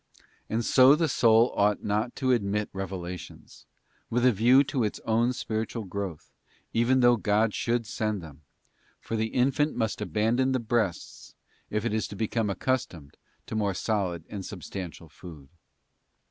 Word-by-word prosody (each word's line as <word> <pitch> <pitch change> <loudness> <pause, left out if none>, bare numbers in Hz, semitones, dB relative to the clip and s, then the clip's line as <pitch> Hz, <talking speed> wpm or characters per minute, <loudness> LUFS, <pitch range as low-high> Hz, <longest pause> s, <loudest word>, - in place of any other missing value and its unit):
And 115 +1 -1
so 130 +2 +7
the 165 +1 +1
soul 115 -3 +4
ought 105 0 +2
not 105 +4 -1
to 130 -1 0
admit 105 -3 0
revelations, 90 -2 -7 0.4
with 120 +2 +1
a 125 - +6
view 120 +6 +5
to 135 -3 -1
its 105 - -2
own 115 +2 +2
spiritual 115 -1 -3
growth, 95 -4 -6 0.4
even 125 +3 +3
though 120 -1 +5
God 105 0 +1
should 120 0 -1
send 110 -1 -2
them; 75 -3 -12 0.6
for 115 - -5
the 110 0 0
infant 135 +6 +1
must 110 -1 -2
abandon 120 +5 +1
the 130 - +1
breasts 110 -6 -3 0.3
if 105 +1 -2
it 115 - -1
is 110 - -1
to 100 - -9
become 110 +1 -1
accustomed 95 - -3 0.3
to - - -6
more 100 -3 0
solid 90 -7 -2
and 100 -2 -6
substantial 90 -3 -7
food. 75 -3 -13
110 Hz, 155 wpm, -27 LUFS, 100-120 Hz, 0.6 s, so